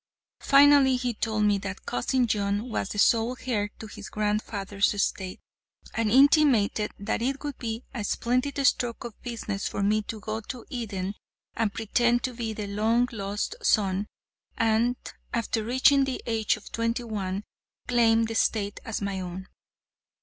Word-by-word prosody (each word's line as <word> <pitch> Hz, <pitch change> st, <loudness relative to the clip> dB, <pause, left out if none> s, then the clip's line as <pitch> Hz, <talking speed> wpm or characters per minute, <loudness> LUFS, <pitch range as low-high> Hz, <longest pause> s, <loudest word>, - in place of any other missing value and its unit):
Finally, 280 Hz, -1 st, +6 dB
he 250 Hz, -1 st, -1 dB
told 215 Hz, -1 st, -1 dB
me 205 Hz, -1 st, +3 dB
that 195 Hz, -1 st, -6 dB
Cousin 245 Hz, -, +1 dB
John 205 Hz, +1 st, -1 dB
was 190 Hz, -, -2 dB
the -, -, -5 dB
sole 230 Hz, +4 st, +3 dB
heir 210 Hz, -5 st, 0 dB
to -, -, -8 dB
his 210 Hz, -, -9 dB
grandfather's 210 Hz, -1 st, 0 dB
estate, 190 Hz, -2 st, -2 dB, 0.5 s
and 225 Hz, -1 st, 0 dB
intimated 260 Hz, -5 st, +4 dB
that 200 Hz, +3 st, -2 dB
it 270 Hz, +4 st, -1 dB
would 290 Hz, -2 st, -5 dB
be 230 Hz, 0 st, -4 dB
a 235 Hz, -5 st, -3 dB
splendid 250 Hz, +7 st, 0 dB
stroke 240 Hz, -2 st, +1 dB
of 235 Hz, -3 st, -9 dB
business 220 Hz, -4 st, -4 dB
for 200 Hz, -, -3 dB
me 215 Hz, +2 st, +2 dB
to 215 Hz, +1 st, -7 dB
go 215 Hz, +2 st, -4 dB
to 235 Hz, +2 st, -8 dB
Eden 200 Hz, -6 st, -3 dB, 0.4 s
and 225 Hz, -3 st, 0 dB
pretend 235 Hz, +3 st, +1 dB
to 255 Hz, -, -2 dB
be 230 Hz, -2 st, -3 dB
the 215 Hz, -1 st, -5 dB
long 220 Hz, +4 st, +1 dB
lost 205 Hz, -, -3 dB
son, 200 Hz, -, +2 dB, 0.5 s
and, 230 Hz, +2 st, +2 dB, 0.4 s
after 230 Hz, -1 st, -1 dB
reaching 260 Hz, +4 st, +4 dB
the 265 Hz, -1 st, -3 dB
age 225 Hz, -2 st, +1 dB
of 215 Hz, -, -13 dB
twenty 230 Hz, +1 st, -1 dB
one, 200 Hz, -3 st, -3 dB, 0.4 s
claim 230 Hz, -2 st, +4 dB
the 225 Hz, -, -2 dB
estate 205 Hz, -2 st, 0 dB
as 225 Hz, -, -4 dB
my 200 Hz, -1 st, -2 dB
own. 185 Hz, +1 st, -6 dB
225 Hz, 160 wpm, -27 LUFS, 205-245 Hz, 0.5 s, Finally